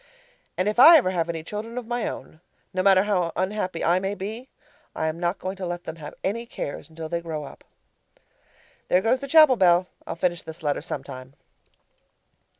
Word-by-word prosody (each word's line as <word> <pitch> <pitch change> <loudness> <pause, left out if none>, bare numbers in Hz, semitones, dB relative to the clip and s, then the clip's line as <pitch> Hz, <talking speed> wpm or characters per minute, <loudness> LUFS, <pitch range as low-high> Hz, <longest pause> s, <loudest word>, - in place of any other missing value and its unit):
And 185 - 0
if 210 +3 0
I 325 +6 +10
ever 210 -11 +1
have 170 -2 -1
any 165 -1 -4
children 215 +7 -6
of 250 - -4
my 240 0 -2
own, 155 - -8 0.3
no 185 - 0
matter 190 0 +5
how 185 -5 0
unhappy 185 -2 -2
I 175 +2 +3
may 195 +2 -3
be, 220 +7 -6 0.5
I - - -2
am 160 +1 -2
not 175 +2 -1
going 185 +1 -5
to 190 - -4
let 175 0 -5
them 160 +1 -7
have 150 -2 -9
any 230 +5 -2
cares 155 - -6
until 160 0 -7
they 170 +1 -3
grow 160 -3 -5
up. - - -12 1.2
(There 180 - +3
goes 245 +3 +2
the 275 - -6
chapel 305 -3 +6
bell 180 -2 +4 0.2
I'll - - -4
finish 175 0 -1
this 160 +1 -10
letter 145 -1 0
sometime). 135 -4 -7
185 Hz, 195 wpm, -24 LUFS, 165-210 Hz, 1.2 s, I